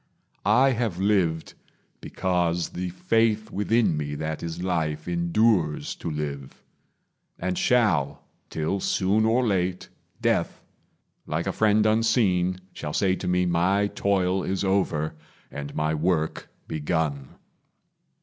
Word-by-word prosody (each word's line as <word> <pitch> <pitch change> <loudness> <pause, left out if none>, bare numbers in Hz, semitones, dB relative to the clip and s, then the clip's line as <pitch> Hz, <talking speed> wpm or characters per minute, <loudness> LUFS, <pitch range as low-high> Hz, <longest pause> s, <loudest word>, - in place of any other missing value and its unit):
I 125 +6 +5
have 115 -7 -1
lived, 95 -5 +1 0.5
Because 85 -2 -1
the 90 0 -4
faith 110 +3 +1
within 105 -2 +2
me 75 -1 -3
that 80 +1 -4
is 85 +1 -5
life 80 -4 -1
Endures 85 -1 +1
to - - -5
live, 70 -3 -5 0.7
and 90 0 -2
shall, 85 - +2 0.3
till 80 +5 -2
soon 100 +4 +1
or 120 +3 +2
late, 90 -4 -1 0.3
Death, - - 0 0.7
like 80 +2 -2
a 95 - 0
friend 110 0 +3
unseen, 110 -5 +2 0.2
shall 75 - -5
say 95 -2 +2
to - - -5
me 90 0 +2
My 90 +4 +2
toil 95 -1 +1
is 95 +1 -2
over 95 -6 0 0.4
and 70 0 -7
my 75 +1 0
work 80 0 -1 0.2
begun. 75 -3 -2
90 Hz, 120 wpm, -25 LUFS, 80-105 Hz, 0.7 s, I